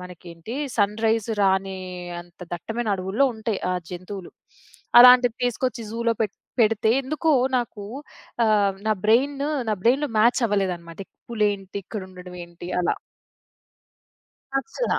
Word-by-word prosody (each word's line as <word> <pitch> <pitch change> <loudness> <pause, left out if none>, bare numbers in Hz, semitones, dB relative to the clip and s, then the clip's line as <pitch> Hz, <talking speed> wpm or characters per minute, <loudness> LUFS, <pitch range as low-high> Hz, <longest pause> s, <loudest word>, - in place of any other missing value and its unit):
మనకేంటి 180 +3 -9 0.2
సన్‌రైజ్ 220 +1 +1
రాని 190 -1 +2 0.4
అంత 175 0 -18
దట్టమైన 225 +6 -4
అడవుల్లో 190 +8 +1
ఉంటాయి 220 -2 -2
ఆ - - +1 0.2
జంతువులు. 185 +1 -7 0.7
అలాంటివి 250 -1 +8
తీసుకొచ్చి 245 0 -1
జూలో 230 0 0
పెట్ 205 - -2 0.3
పెడితే 220 0 +3
ఎందుకో 310 +4 0 0.2
నాకు 225 -4 -3 0.6
ఆహ్, 205 -3 +3
నా 215 - +4
బ్రెయిను 275 +6 +2 0.4
బ్రెయిన్‌లో 270 +5 +3
మ్యాచ్ 235 +4 +4
అవ్వలేదన్నమాట. 180 -5 -2 0.3
పులేంటి 205 -3 -1
ఇక్కడ 210 +1 -6
ఉండడం 180 0 -11
ఏంటి 170 +1 -11
అలా. 175 - 0 1.6
నచ్చలా. 455 - -1
215 Hz, 110 wpm, -24 LUFS, 190-235 Hz, 1.6 s, అలాంటివి